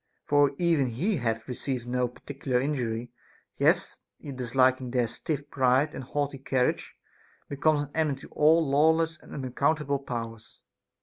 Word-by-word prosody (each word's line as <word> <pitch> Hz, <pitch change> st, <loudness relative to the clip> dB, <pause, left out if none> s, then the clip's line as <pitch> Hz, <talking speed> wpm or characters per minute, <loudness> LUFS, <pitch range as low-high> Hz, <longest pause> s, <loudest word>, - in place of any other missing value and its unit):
For 145 Hz, -1 st, +3 dB
even 165 Hz, -6 st, +2 dB
he 170 Hz, -, -1 dB
that -, -, -5 dB
hath 115 Hz, -1 st, -2 dB
received 125 Hz, -1 st, -3 dB
no 125 Hz, 0 st, 0 dB
particular 130 Hz, +1 st, -3 dB
injury, 120 Hz, -4 st, -2 dB, 0.4 s
yet -, -, +1 dB, 0.2 s
disliking 130 Hz, -1 st, +1 dB
their 125 Hz, -1 st, +1 dB
stiff 140 Hz, +5 st, -4 dB
pride 130 Hz, +3 st, +2 dB
and 135 Hz, -, -6 dB
haughty 145 Hz, +1 st, -3 dB
carriage, 130 Hz, -1 st, -1 dB, 0.5 s
becomes 145 Hz, +1 st, +1 dB
an 145 Hz, -, -10 dB
enemy 155 Hz, -4 st, 0 dB
to -, -, -12 dB
all 160 Hz, +1 st, +4 dB
lawless 160 Hz, +3 st, +3 dB
and -, -, -16 dB
unaccount 140 Hz, +3 st, 0 dB
able 140 Hz, -1 st, -1 dB
powers. 115 Hz, -4 st, -7 dB
135 Hz, 145 wpm, -27 LUFS, 125-150 Hz, 0.5 s, all